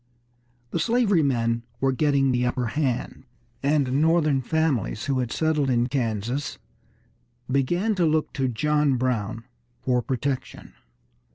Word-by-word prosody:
The 170 Hz, -, -1 dB
slavery 210 Hz, -2 st, +3 dB
men 115 Hz, -4 st, +1 dB, 0.2 s
were 135 Hz, +1 st, +2 dB
getting 140 Hz, -1 st, +2 dB
the 125 Hz, 0 st, +1 dB
upper 125 Hz, -1 st, -1 dB
hand, 135 Hz, -6 st, -2 dB, 0.4 s
and 140 Hz, -1 st, +1 dB
Northern 155 Hz, -4 st, +3 dB
families 135 Hz, -7 st, 0 dB
who 135 Hz, -2 st, 0 dB
had 125 Hz, -2 st, -2 dB
settled 155 Hz, -3 st, +1 dB
in 120 Hz, -1 st, +2 dB
Kansas 120 Hz, +1 st, -2 dB, 0.9 s
began 175 Hz, +11 st, +1 dB
to 180 Hz, -4 st, +1 dB
look 155 Hz, 0 st, 0 dB
to 135 Hz, -1 st, 0 dB
John 150 Hz, +3 st, +1 dB
Brown 115 Hz, -3 st, -1 dB, 0.4 s
for 125 Hz, -1 st, +2 dB
protection. 130 Hz, +2 st, -4 dB
135 Hz, 125 wpm, -25 LUFS, 125-155 Hz, 0.9 s, slavery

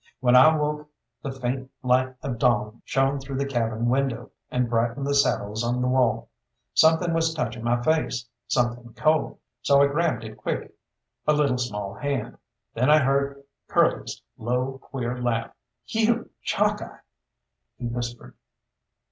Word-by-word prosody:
When 125 Hz, 0 st, +4 dB
I 155 Hz, +5 st, +8 dB
woke 150 Hz, 0 st, -2 dB, 0.3 s
the 140 Hz, -, -4 dB
faint 130 Hz, 0 st, -3 dB
light 130 Hz, +1 st, +2 dB
of 120 Hz, -4 st, -3 dB
dawn 115 Hz, -3 st, +1 dB
shone 135 Hz, +1 st, +1 dB
through 135 Hz, 0 st, -5 dB
the 140 Hz, -, 0 dB
cabin 115 Hz, -3 st, -1 dB
window, 125 Hz, -2 st, 0 dB, 0.2 s
and 125 Hz, -1 st, 0 dB
brightened 115 Hz, +4 st, 0 dB
the 140 Hz, -, 0 dB
saddles 110 Hz, -5 st, +1 dB
on 120 Hz, +1 st, 0 dB
the 125 Hz, -, +1 dB
wall. 125 Hz, -3 st, +1 dB, 0.4 s
Something 160 Hz, +2 st, +4 dB
was 165 Hz, 0 st, +1 dB
touching 120 Hz, -6 st, -3 dB
my 120 Hz, 0 st, +1 dB
face, 155 Hz, -6 st, 0 dB, 0.2 s
something 120 Hz, -1 st, -1 dB
cold, 155 Hz, 0 st, +1 dB, 0.2 s
so 140 Hz, -1 st, +4 dB
I 140 Hz, -, +7 dB
grabbed 155 Hz, +2 st, 0 dB
it 110 Hz, -1 st, -9 dB
quick -, -, -4 dB, 0.5 s
a 150 Hz, -, +5 dB
little 140 Hz, -4 st, +2 dB
small 105 Hz, -5 st, -3 dB
hand. 140 Hz, +6 st, -3 dB, 0.3 s
Then 125 Hz, +4 st, +1 dB
I 155 Hz, -, +8 dB
heard 140 Hz, 0 st, +1 dB, 0.2 s
Curly's -, -, +1 dB, 0.2 s
low, 125 Hz, +3 st, -1 dB
queer 125 Hz, -2 st, -4 dB
laugh. 115 Hz, -2 st, -1 dB, 0.3 s
"You, 225 Hz, -, 0 dB
Chalkeye!" -, -, 0 dB, 0.8 s
he 125 Hz, -, -6 dB
whispered. 120 Hz, 0 st, -5 dB
130 Hz, 150 wpm, -25 LUFS, 120-140 Hz, 0.8 s, I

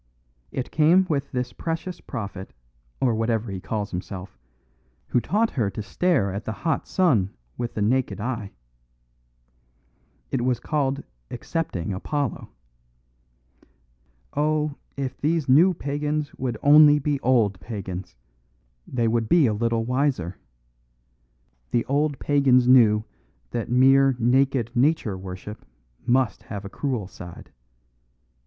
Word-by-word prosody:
It 130 Hz, -, -4 dB
came 165 Hz, +5 st, +4 dB
with 140 Hz, -3 st, -1 dB
this 125 Hz, -1 st, -3 dB
precious 165 Hz, +2 st, -4 dB
prophet, 100 Hz, -, -7 dB, 0.5 s
or 125 Hz, -3 st, +2 dB
whatever 115 Hz, -1 st, -1 dB
he 95 Hz, -, -4 dB
calls 105 Hz, -1 st, -3 dB
himself, 90 Hz, +1 st, -6 dB, 0.7 s
who 120 Hz, -, +2 dB
taught 220 Hz, -, +1 dB
her 115 Hz, -7 st, 0 dB
to 100 Hz, +2 st, -6 dB
stare 125 Hz, -, +1 dB
at 100 Hz, +3 st, -4 dB
the 110 Hz, -, -4 dB
hot 160 Hz, -4 st, 0 dB
sun 125 Hz, -, +2 dB, 0.2 s
with 120 Hz, -1 st, -4 dB
the 105 Hz, -, 0 dB
naked 115 Hz, -3 st, 0 dB
eye. 115 Hz, -3 st, -3 dB, 1.8 s
It -, -, 0 dB
was 125 Hz, -2 st, +1 dB
called 140 Hz, 0 st, -1 dB, 0.3 s
accepting 120 Hz, -, -3 dB
Apollo. 140 Hz, +6 st, -3 dB, 1.9 s
Oh, 150 Hz, 0 st, +1 dB, 0.2 s
if 135 Hz, -2 st, -4 dB
these 155 Hz, 0 st, +1 dB
new 160 Hz, +9 st, +6 dB
pagans 150 Hz, -1 st, -2 dB
would 125 Hz, -4 st, -3 dB
only 150 Hz, 0 st, +8 dB
be 145 Hz, -1 st, -1 dB
old 115 Hz, -8 st, +2 dB
pagans, 95 Hz, -, -6 dB, 0.7 s
they 120 Hz, -2 st, 0 dB
would 115 Hz, -1 st, 0 dB
be 170 Hz, -4 st, +5 dB
a 110 Hz, -, +2 dB
little 115 Hz, +1 st, 0 dB
wiser! 125 Hz, -, -1 dB, 1.3 s
The 120 Hz, -, 0 dB
old 145 Hz, +1 st, 0 dB
pagans 135 Hz, -4 st, +3 dB
knew 110 Hz, -4 st, +6 dB, 0.5 s
that 120 Hz, -2 st, -3 dB
mere 135 Hz, +2 st, +5 dB
naked 125 Hz, 0 st, +2 dB
Nature 125 Hz, -5 st, +2 dB
worship 95 Hz, +3 st, -8 dB, 0.4 s
must 125 Hz, -3 st, +2 dB
have 100 Hz, -2 st, -7 dB
a -, -, -6 dB
cruel 125 Hz, -3 st, -3 dB
side. 90 Hz, -2 st, -11 dB
125 Hz, 125 wpm, -24 LUFS, 105-145 Hz, 1.9 s, only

